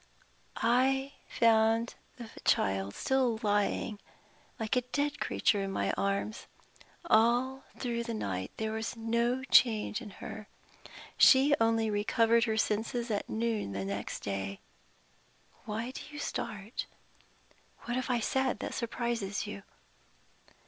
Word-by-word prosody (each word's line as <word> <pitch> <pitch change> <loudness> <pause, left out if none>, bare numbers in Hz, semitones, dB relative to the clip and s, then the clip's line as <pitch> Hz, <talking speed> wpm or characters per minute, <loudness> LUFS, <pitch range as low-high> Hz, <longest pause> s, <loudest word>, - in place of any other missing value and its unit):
I 265 +4 +2 0.2
found 225 +1 +3 0.2
the 235 -2 -9
child 95 0 +1
still 255 -4 +1
lying, 205 0 0 0.6
like 220 +1 -1
a 250 - +3
dead 285 +4 -2
creature, 205 - +1
in 195 0 -3
my - - 0
arms. 200 +2 -2 0.6
All 250 +1 +3
through 235 -2 -2
the 230 -1 -3
night 95 - -3
there 220 0 -2
was 220 +2 -4
no 235 +3 0
change 230 -3 +4
in 220 - -8
her. 215 -1 -8 0.7
She 275 +2 +7
only 225 -1 +2
recovered 230 +2 +3
her 220 -2 -1
senses 225 +3 -1
at 205 - -2
noon 220 - -1
the 95 0 -3
next 100 +1 -4
day. 100 -1 -3 1.1
Why 225 +4 -3
do - - -8
you 295 - -9
start? 220 -6 -4 0.9
What 240 - -4
have 255 0 -2
I 240 -2 +1
said 265 +2 0
that - - -5
surprises 235 -4 -2
you?" 100 - -7
225 Hz, 130 wpm, -31 LUFS, 210-245 Hz, 1.1 s, She